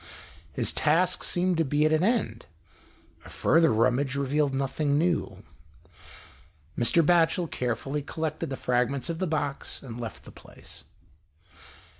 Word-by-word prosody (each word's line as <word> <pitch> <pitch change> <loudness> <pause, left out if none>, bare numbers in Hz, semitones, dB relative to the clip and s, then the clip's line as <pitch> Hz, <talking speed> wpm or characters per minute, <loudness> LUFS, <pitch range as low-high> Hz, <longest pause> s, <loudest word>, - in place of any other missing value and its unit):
His - - -1
task 175 +4 +1
seemed 180 0 0
to 165 - +3
be 150 +1 +1
at 155 - +3
an 155 +2 +2
end, 195 - 0 0.8
a - - -13
further 165 -1 +3
rummage 125 +5 +1
revealed 140 +1 0
nothing 140 +2 0
new. 170 +2 -1 1.3
Mr. 155 +7 +3
Batchel 170 +1 +3
carefully 125 +3 -3
collected 155 +1 -4
the 135 - -4
fragments 125 +2 -1
of 165 - -6
the 185 - -1
box, 145 -3 -3
and 120 -2 -8
left 115 -4 -7
the - - -13
place. - - -14
150 Hz, 135 wpm, -27 LUFS, 130-165 Hz, 1.3 s, to